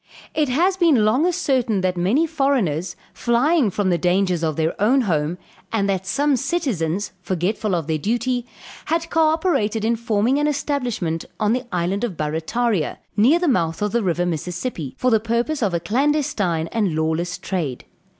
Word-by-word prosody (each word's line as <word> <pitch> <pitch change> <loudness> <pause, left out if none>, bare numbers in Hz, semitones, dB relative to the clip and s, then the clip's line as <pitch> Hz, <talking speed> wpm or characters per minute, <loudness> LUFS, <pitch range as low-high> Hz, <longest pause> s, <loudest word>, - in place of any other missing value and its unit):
"It 300 -3 +1
had 360 +9 +2
been 300 - +4
long 255 +11 +3
ascertained 260 - 0
that 185 -1 +1
many 200 - +2
foreigners, 245 - 0 0.2
flying 250 +2 +2
from 190 0 0
the 170 - +1
dangers 180 0 +1
of 155 -2 0
their 160 +1 0
own 255 +6 +4
home, 165 -5 0 0.3
and 205 -3 +1
that 190 -1 -1
some 285 +6 +2
citizens, 220 - -1
forgetful 185 +3 -1
of 165 -3 -2
their 155 0 -1
duty, 240 - -1 0.4
had 335 0 -1
co 320 -1 +4
operated 275 - +1
in 230 +1 +2
forming 230 +3 +1
an 295 - +2
establishment 250 - -2
on 210 +1 +2
the 255 +1 -2
island 180 +4 -1
of 205 -9 -3
Barrataria, 160 +5 -1 0.2
near 250 +11 +5
the 350 0 0
mouth 165 - +1
of 210 - 0
the 235 - +1
river 175 -3 0
Mississippi, 175 - -4
for 255 - +1
the 220 - +4
purpose 235 +7 -1
of 205 -4 +1
a 170 - 0
clandestine 205 - 0
and 205 -8 0
lawless 160 +3 -1
trade. 155 -10 -4
215 Hz, 170 wpm, -21 LUFS, 175-265 Hz, 0.4 s, near